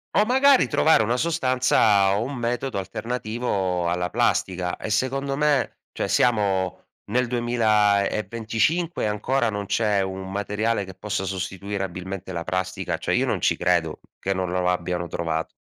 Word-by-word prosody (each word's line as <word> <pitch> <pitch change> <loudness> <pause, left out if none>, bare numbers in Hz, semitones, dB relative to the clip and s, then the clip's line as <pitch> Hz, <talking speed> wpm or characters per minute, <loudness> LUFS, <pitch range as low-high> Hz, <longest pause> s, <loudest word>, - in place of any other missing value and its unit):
O 210 - +5
magari 265 +3 +5
trovare 160 -8 +4
una 120 +3 0
sostanza 125 -10 +3
o 110 - 0
un 135 +2 -5
metodo 120 0 -2
alternativo 105 -3 -2
alla 90 0 -1
plastica. 90 -1 0
E - - -6
secondo 135 +5 0
me, 145 -3 +1
cioè - - -3
siamo 100 -6 +1 0.3
nel 125 +1 +2
2025 115 - +1
ancora 115 +4 0
non 105 -1 -3
c'è 105 -3 +1
un 95 0 -4
materiale 105 +1 -1
che 95 - -10
possa 105 0 -3
sostituire 95 +1 -4
abilmente 95 0 -6
la 85 -2 -3
plastica. 90 +1 -2
Cioè - - -2
io - - +2
non - - -1
ci - - +2
credo 85 -3 +1 0.2
che 95 - -1
non 95 -1 -2
lo 90 0 0
lo 90 - +1
abbiano 90 -1 -1
trovato. 80 -1 -2
105 Hz, 155 wpm, -24 LUFS, 95-120 Hz, 0.3 s, O